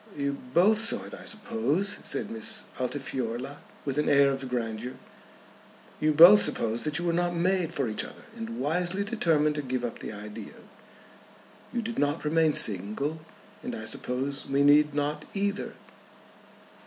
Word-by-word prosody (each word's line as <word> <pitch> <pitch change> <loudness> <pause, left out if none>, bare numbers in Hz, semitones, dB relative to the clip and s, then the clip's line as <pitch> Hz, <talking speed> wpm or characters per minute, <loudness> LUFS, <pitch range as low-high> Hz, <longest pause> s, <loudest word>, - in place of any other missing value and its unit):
"You 140 0 -1 0.2
both 200 +8 +4
saw 225 - +1
it, - - -10
I - - -9
suppose?" 195 - 0
said 210 - -2
Miss 225 -1 -3 0.2
Altifiorla, 130 0 -3 0.3
with 140 0 -1
an 150 - +1
air 140 -1 +5
of 135 -1 -4
grandeur. 120 0 -3 1.1
"You 155 0 +2
both 175 +7 +9
supposed 115 +3 -1
that 150 0 0
you 175 - -3
were 170 - +1
not 175 0 0
made 180 -1 +1
for 140 -6 -1
each 110 - -1
other, - - -11
and 230 0 -6
wisely 180 +5 0
determined 165 -9 +1
to - - 0
give 130 -2 -2
up 120 - -5
the - - -6
idea. 105 0 -9 1.2
You 240 -1 -2
did 230 +1 -4
not 145 +2 0
remain 160 0 +3
single, 110 - +1 0.4
and - - -5
I - - -7
suppose 135 +3 -3
we 140 +1 +2
need 145 0 +5
not 150 +1 -1
either." 200 +1 -2
150 Hz, 160 wpm, -28 LUFS, 130-180 Hz, 1.2 s, both